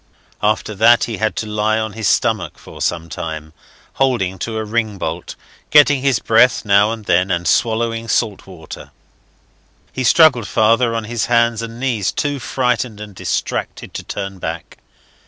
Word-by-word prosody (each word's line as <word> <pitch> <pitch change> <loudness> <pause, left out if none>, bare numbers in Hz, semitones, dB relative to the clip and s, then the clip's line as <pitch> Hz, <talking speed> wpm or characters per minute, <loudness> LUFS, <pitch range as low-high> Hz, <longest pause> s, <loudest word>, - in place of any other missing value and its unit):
After 110 0 0
that 115 +4 +5
he 115 -2 -3
had 110 +2 -1
to - - -3
lie 105 +1 0
on 110 -1 -3
his 110 -2 -2
stomach - - 0
for - - -13
some 85 -1 -1
time, 80 -1 -6 0.5
holding 95 -9 +1
to 110 +4 -4
a 110 - -3
ring 110 -1 -1
bolt, 85 -1 -5 0.3
getting 145 -2 +5
his 135 -3 +2
breath 115 +2 +3
now 100 +1 +4
and 110 -2 -6
then, 90 +1 +2
and 85 -1 -1
swallowing 115 0 0
salt 110 -3 -1
water. 90 -4 -11 1.0
He 130 - -3
struggled 125 -3 +5
farther 115 +2 +2
on 115 - -2
his 115 +1 -2
hands 115 -1 +2
and 115 0 -7
knees, 120 -7 -1
too 145 -1 -2
frightened 125 -4 -1
and 105 -1 -9
distracted - - -4
to - - -5
turn 95 -1 -6
back. 80 -2 -6
110 Hz, 165 wpm, -18 LUFS, 100-120 Hz, 1.0 s, that